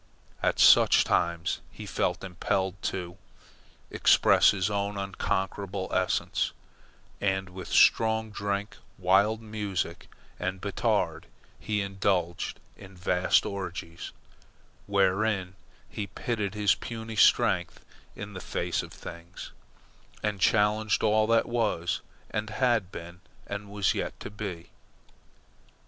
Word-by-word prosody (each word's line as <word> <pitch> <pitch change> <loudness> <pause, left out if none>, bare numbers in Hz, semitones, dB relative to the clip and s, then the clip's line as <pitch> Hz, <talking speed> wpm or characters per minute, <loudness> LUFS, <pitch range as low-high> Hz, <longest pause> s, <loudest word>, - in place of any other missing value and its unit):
At - - +1
such - - +7
times 85 0 0
he - - -9
felt - - -1
impelled 95 0 -2
to 90 0 -6 0.7
express - - +5
his 95 -2 +1
own 100 0 -2
unconquerable 95 0 -2
essence; 95 0 0 0.7
and 95 -1 0
with 90 -1 -8
strong 110 -1 +4
drink, 100 0 -3 0.2
wild 100 +5 +3
music, 100 -6 -4 0.3
and 95 +1 -2
Batard, - - -1 0.3
he 105 -2 -1
indulged 95 -3 -1 0.2
in 95 -2 -13
vast 90 0 +2
orgies, 90 -4 -5 0.8
wherein 100 -1 +1 0.3
he 105 - -5
pitted 105 0 -3
his 105 -2 +4
puny 115 -1 -6
strength 100 - +3 0.3
in 105 0 -7
the 95 - -7
face - - -2
of - - -10
things, 85 +1 -10 0.7
and 105 -3 -1
challenged 105 +1 +2
all 110 0 +3
that 115 0 +3
was, 110 -8 0 0.3
and 105 0 -2
had 110 -4 +1
been, 85 +1 -9 0.2
and 100 0 -6
was 100 -2 +1
yet - - -4
to - - -7
be. 95 -5 -6
100 Hz, 115 wpm, -28 LUFS, 90-105 Hz, 0.8 s, such